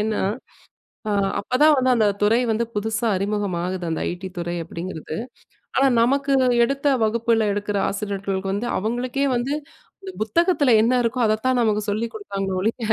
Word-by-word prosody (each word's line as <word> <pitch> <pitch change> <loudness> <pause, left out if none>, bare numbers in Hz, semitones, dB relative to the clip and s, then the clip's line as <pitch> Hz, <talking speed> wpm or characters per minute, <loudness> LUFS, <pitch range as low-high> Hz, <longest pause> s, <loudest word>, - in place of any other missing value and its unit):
ஏன்னா, 215 0 -1 0.9
ஆ - - 0 0.3
அப்பதான் 295 +8 +4
வந்து 260 0 +3
அந்த 220 -3 +3
துறை 220 +3 +4
வந்து 225 +2 0
புதுசா 220 +2 -1
அறிமுகமாகுது. 185 -3 -2
அந்த 160 - -2
ஐடி 180 +2 -6
துறை 175 0 -3
அப்படிங்கிறது. 165 -1 -6 0.6
ஆனா, 270 - +4
நமக்கு 275 +3 +2 0.3
எடுத்த 275 +3 -2 0.2
வகுப்பில 225 0 +1
எடுக்குற 205 0 -2
ஆசிரியர்களுக்கு 195 -1 -3
வந்து, 205 +5 -2
அவங்களுக்கே 245 +6 -1
வந்து 245 +4 -1 0.5
இந்த 385 - -7
புத்தகத்தில 290 - +2
என்ன 235 +3 +2
இருக்கோ 240 +2 -1
அதைத்தான் 225 +4 +1
நமக்கு 215 -2 +2
சொல்லிக் 225 +3 -2
குடுத்தாங்களே 195 -3 -4
ஒழிய, 220 +6 -1
215 Hz, 145 wpm, -22 LUFS, 195-245 Hz, 0.9 s, அப்பதான்